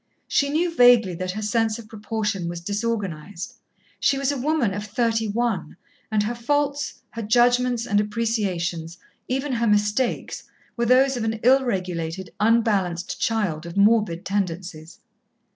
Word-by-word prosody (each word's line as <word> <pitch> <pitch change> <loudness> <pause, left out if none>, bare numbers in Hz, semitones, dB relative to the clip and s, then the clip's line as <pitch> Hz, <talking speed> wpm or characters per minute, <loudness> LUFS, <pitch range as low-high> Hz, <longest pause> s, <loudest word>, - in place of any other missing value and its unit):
She 280 - +2
knew 330 +3 0
vaguely 245 - +6
that 185 +1 -4
her 215 +2 -4
sense 220 +1 +1
of 230 -2 -11
proportion 210 -4 -3
was 170 0 -5
disorganized. 200 -3 -4 0.5
She 275 - +2
was 275 0 0
a - - -2
woman 275 -6 +1
of 205 +1 -4
thirty 225 +1 0
one, 225 -1 -2 0.3
and 215 -1 +2
her 225 +3 -2
faults, 285 +3 -1
her 230 - -5
judgments 245 +1 +3
and 205 -2 +2
appreciations, 190 -7 -2 0.3
even 265 +2 -1
her 235 -1 +1
mistakes, 210 +4 0 0.3
were 235 -1 0
those 260 +2 +4
of 235 - -2
an 225 0 -2
ill 265 +3 +5
regulated, 180 -5 -3
unbalanced 205 -6 +1
child 185 -8 -1
of 170 - -8
morbid 205 -4 +3
tendencies. 175 -4 -3
220 Hz, 145 wpm, -23 LUFS, 190-240 Hz, 0.5 s, vaguely